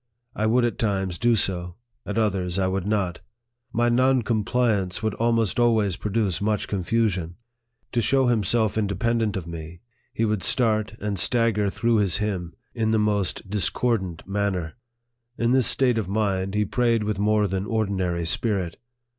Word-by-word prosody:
I 110 - 0
would 120 +2 +3
at 120 - -2
times 95 -5 -1
do 120 -1 +3
so; 90 -4 -1 0.3
at 105 - -3
others, 95 -5 0
I 95 - +1
would 95 +1 -1
not. 100 -4 -1 0.5
My 120 +1 +1
non 130 +1 +3
compliance 110 -4 0
would 110 -2 0
almost 115 0 +1
always 110 -6 +3
produce 105 -2 -1
much 105 0 0
confusion. 95 -3 -1 0.6
To 120 - +1
show 130 +3 +2
himself 110 -2 +1
independent 110 +1 0
of 90 - -5
me, 85 0 -8 0.3
he 115 - 0
would 105 -3 0
start 110 -3 +1
and 105 -2 -2
stagger 115 -3 +2
through 115 +3 +1
with - - +3
his 100 -2 +1
hymn 95 -5 -3 0.2
in 110 -2 0
the 110 - +2
most 105 -4 0
discordant 95 -2 -1
manner. 95 -4 -2 0.6
In 115 +1 +1
this 130 -3 +3
state 125 -2 +2
of 105 - -3
mind, 100 -2 -1
he 105 0 +2
prayed 115 0 +1
with 105 -1 -2
more 105 0 +2
than 95 +1 -2
ordinary 95 -6 -1
spirit. 95 -1 0
105 Hz, 165 wpm, -24 LUFS, 95-115 Hz, 0.6 s, would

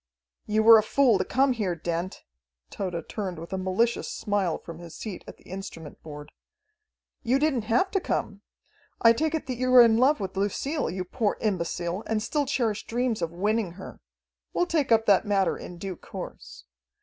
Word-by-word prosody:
"You 215 +1 +2
were 225 0 +9
a - - +3
fool 235 -1 +3
to - - +2
come 265 0 +2
here, 200 -7 -1
Dent." 170 +2 -4 0.5
Tode 180 -4 -4
turned 190 -5 -4
with 165 +3 -8
a - - -1
malicious 190 +6 0
smile 200 -6 -1
from 165 -1 -10
his 170 -1 -10
seat 205 -5 -7
at - - -10
the - - -23
instrument 180 -5 -9
board. 150 -1 -10 0.9
"You 250 +2 +2
didn't 275 -6 +1
have 245 - +2
to 390 - +1
come. 200 - -3 0.6
I 230 0 +6
take 315 +6 0
it 320 - -3
that 255 -2 -4
you 255 +1 0
are 250 - +11
in 225 -1 +4
love 270 +5 +4
with 190 -1 -5
Lucille, 235 - -1
you 185 +2 -3
poor 215 +2 -1
imbecile, 175 -2 -2
and 215 -1 0
still 290 +1 -1
cherish 230 -6 -1
dreams 240 -3 -1
of 170 - -1
winning 205 +1 -1
her. 190 +1 -10 0.5
We'll 355 - +2
take 310 -7 0
up 225 0 +4
that 200 -3 +5
matter 195 -2 +2
in 175 - -9
due 185 0 -6
course. 65 -1 -9
210 Hz, 190 wpm, -26 LUFS, 180-245 Hz, 0.9 s, are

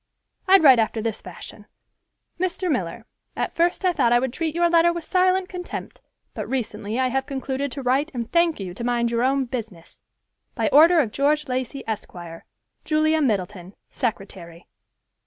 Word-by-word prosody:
I'd 385 -2 +6
write 265 -5 +8
after 225 0 0
this 220 -1 -3
fashion: 195 +3 -11 0.7
'Mr. 365 -1 -1
Miller—At 225 - -5
first 350 +3 +1
I 365 - +3
thought 235 - +2
I 240 - +6
would 250 0 -1
treat 320 0 -3
your 345 0 +3
letter 340 0 +4
with 340 -1 -5
silent 370 +2 +2
contempt, 360 -1 -7 0.3
but - - -6
recently 230 -3 -3
I 260 -1 +2
have 265 +1 -2
concluded 270 0 -3
to 275 - -6
write 270 +5 +1
and 235 -3 -5
thank 340 -4 +2
you 185 -3 -6
to 235 - -7
mind 235 -1 0
your 235 0 0
own 265 +1 +1
business. 220 -9 -8 0.5
By - - 0
order 325 +3 +6
of 230 -7 -3
George 295 +4 +1
Lacey, 255 +1 -3
Esq.—Julia 220 - -3
Middleton, 195 -6 -2
Secretary. 190 -7 -5
260 Hz, 160 wpm, -23 LUFS, 220-320 Hz, 0.7 s, write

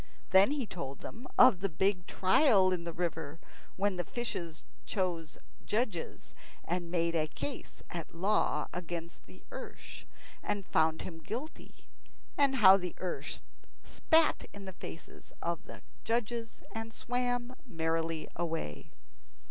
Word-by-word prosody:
Then 190 +3 +7
he 285 -3 0
told 140 -9 -6
them 245 +3 -8
of 225 -8 +8
the 195 - +1
big 185 +2 +1
trial 190 -1 +5
in 175 -2 -1
the 170 - -2
river, 165 -3 -3 0.4
when 195 -1 +1
the 175 - 0
fishes 170 -6 -4 0.2
chose 175 -5 -2 0.3
judges, 210 -6 -2 0.3
and 175 0 -2
made 170 -1 +1
a 155 -2 +2
case 270 - -6
at 170 -1 -6
law 185 -4 +2
against 170 -1 -5
the - - -15
ersh, - - -8 0.4
and 200 -2 -2
found 160 -1 +2
him 165 -3 -7
guilty, 245 - -7 0.5
and 280 -2 +4
how 195 -6 +9
the 180 -3 -4
ersh 185 -1 -3 0.4
spat 320 0 +3
in 200 -1 -8
the 190 - -6
faces 165 - -10
of 170 -1 -2
the - - -10 0.2
judges 230 0 -1
and 225 0 -5
swam 245 0 -1
merrily 165 -3 -1
away. 160 - -3
185 Hz, 135 wpm, -32 LUFS, 165-225 Hz, 0.5 s, how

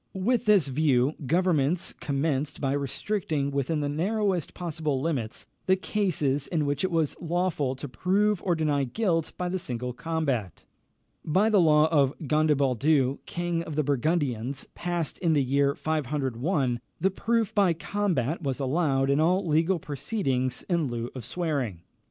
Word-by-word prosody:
With 240 +5 +1
this 200 -8 +5
view, 135 -1 +2
governments 170 0 +1
commenced 145 0 -2
by 135 -2 0
restricting 145 - -1
within 140 +3 -1
the 145 - -1
narrowest 185 +3 -1
possible 155 -5 -2
limits 130 -7 -3 0.2
the 190 - +5
cases 155 -9 0
in 160 -4 0
which 145 +3 -1
it 185 - +1
was 165 -4 0
lawful 170 -6 0
to 145 +2 -7
prove 195 +7 +1
or 175 -3 +1
deny 150 -3 +1
guilt 165 - 0
by 180 - -2
the 185 +1 -2
single 125 -4 -4
combat. 140 - -2 0.6
By 195 +8 +2
the 205 -3 +5
law 155 -1 +5
of 140 -4 +3
Gondebaldus 140 -2 +2
king 175 -1 -2
of 160 -3 -6
the 155 - +1
Burgundians, 140 -3 -1
passed 175 -3 -3
in 170 -3 +2
the 145 -3 +3
year 140 +2 +2
501, 140 -2 -1 0.2
the 190 - +2
proof 225 +2 0
by 195 -4 +4
combat 170 - -1
was 135 -3 -2
allowed 135 -1 +1
in 140 - +2
all 180 +5 +2
legal 165 +3 +2
proceedings 140 - -2
in 170 -5 +1
lieu 120 -1 -4
of 130 - -7
swearing. 130 - -2
155 Hz, 150 wpm, -27 LUFS, 135-175 Hz, 0.6 s, this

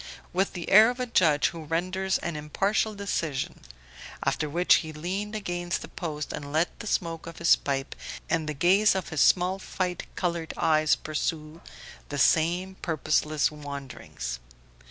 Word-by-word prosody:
with 190 +2 +1
the 175 -2 -5
air 215 +4 +9
of 250 +1 -4
a 250 - 0
judge 160 -10 +3
who 165 -2 -8
renders 185 +4 0
an 170 -2 -3
impartial 195 +8 0
decision; 165 -8 -2 0.6
after 150 - 0
which 175 +4 +4
he 160 -2 -4
leaned 190 +7 -4
against 175 -3 -3
the - - -7
post 150 -4 -5
and 145 -1 -6
let 160 +3 0
the - - -7
smoke 165 -4 -2
of 165 - -9
his 170 - +5
pipe 135 -1 -3 0.3
and 160 -2 0
the 150 - -3
gaze 190 +8 +4
of 190 - -3
his 155 -3 0
small 185 +1 +3 0.2
light 180 -2 -1
coloured 170 -3 -2
eyes 155 -1 +3
pursue 155 +1 -4 0.5
the 145 - -4
same 170 +6 +2
purposeless 155 -2 +1
wanderings. 140 - -7
165 Hz, 155 wpm, -27 LUFS, 150-185 Hz, 0.6 s, air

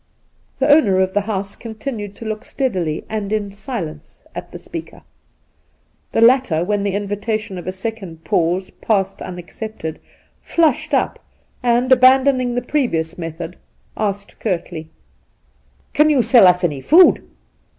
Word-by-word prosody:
The 270 - +1
owner 285 -11 +5
of 190 0 +1
the 205 - +2
house 200 -1 -3
continued 220 -3 -6
to 225 - -10
look 215 0 -4
steadily 185 - -2
and 210 -2 -4
in 210 -2 -1
silence 195 - -7
at - - -7
the - - -7
speaker. - - -9 1.1
The - - +1
latter, 235 -9 +4
when 205 +2 0
the 200 -1 -1
invitation 205 0 -3
of 175 - -10
a - - 0
second 190 -4 -6
pause 175 +3 0
passed 195 -3 0
unac 175 -1 -8
cepted, 215 -8 -6 0.4
flushed 320 -6 +1
up - - 0 0.4
and, 245 +1 +2
abandoning 255 -1 +5
the 245 - -1
previous 235 - -1
method, 165 +1 -6 0.4
asked 200 -1 -3
curtly: 170 -5 -3 0.5
' 65 -1 -39
Can 300 +1 +4
you 275 -5 +3
sell 225 -3 +7
us 180 0 +3
any 145 -6 -1
food 345 - +6
205 Hz, 145 wpm, -19 LUFS, 180-240 Hz, 1.1 s, sell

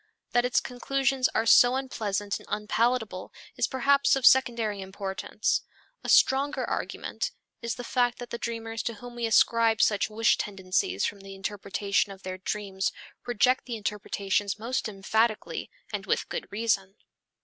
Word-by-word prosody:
That 245 0 +3
its 250 - +3
conclusions 270 +1 0
are 225 - +2
so 245 +2 +7
unpleasant 205 -6 -2
and - - -16
unpalatable 215 -2 -1 0.2
is - - +1
perhaps 280 +2 +3
of 270 -2 -1
secondary 235 -6 +4
importance. 190 +2 -2 0.4
A - - -5
stronger 275 +2 +4
argument - - -3 0.3
is 235 -1 -2
the 245 - -7
fact 245 0 +1
that 245 -1 -9
the 235 - -4
dreamers 225 -1 -4
to 230 - -3
whom 245 +3 -10
we 240 -1 -2
ascribe 225 0 +4
such 210 0 +3
wish 225 +2 +2
tendencies 185 - -1
from 205 - -3
the 195 0 -10
interpretation 200 +1 -1
of 195 0 -12
their 185 0 -5
dreams 195 0 -2 0.4
reject 250 +2 +2
the 240 - -3
interpretations 205 -1 -1
most 230 +1 -2
emphatically, 215 +2 -1 0.2
and - - -4
with - - 0
good - - -4
reason. 205 -3 0
225 Hz, 150 wpm, -27 LUFS, 200-245 Hz, 0.4 s, so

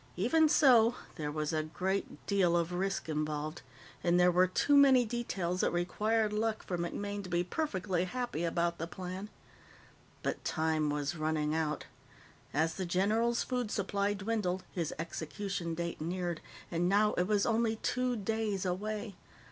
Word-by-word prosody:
Even 320 -1 +4
so, 245 -6 +6 0.2
there 150 -4 -4
was 155 +1 -2
a 155 - +1
great 185 +5 -3
deal 185 -4 +3
of 170 +1 -1
risk 190 +1 -1
involved, 155 0 -2 0.4
and 175 0 +3
there 180 0 +6
were 180 +1 +4
too 285 +10 +2
many 270 -3 +7
details 195 -6 -2
that - - +3
required 210 +5 0
luck 220 +1 -1
for 180 - -3
MacMaine 200 +4 -3
to 185 - -8
be 175 0 +1
perfectly 185 - -1
happy 240 -4 -3
about 170 0 0
the 165 - -3
plan. 185 +3 -6 0.9
But - - -2
time 155 -1 0
was 145 +1 -1
running 155 -1 0
out. 155 -2 -1 0.7
As 160 +3 +1
the 190 - -3
general's 220 +7 +2
food 250 -4 -2
supply 200 0 0
dwindled, 195 -3 -1
his 170 -4 -2
execution 170 +2 -4
date 170 -1 -4
neared, 175 0 -2 0.3
and 175 +1 +1
now 210 +2 +4
it 180 - +1
was 205 -1 +2
only 225 -1 +2
two 250 +2 0
days 215 -2 -1
away. 205 +3 -3
185 Hz, 155 wpm, -32 LUFS, 170-215 Hz, 0.9 s, many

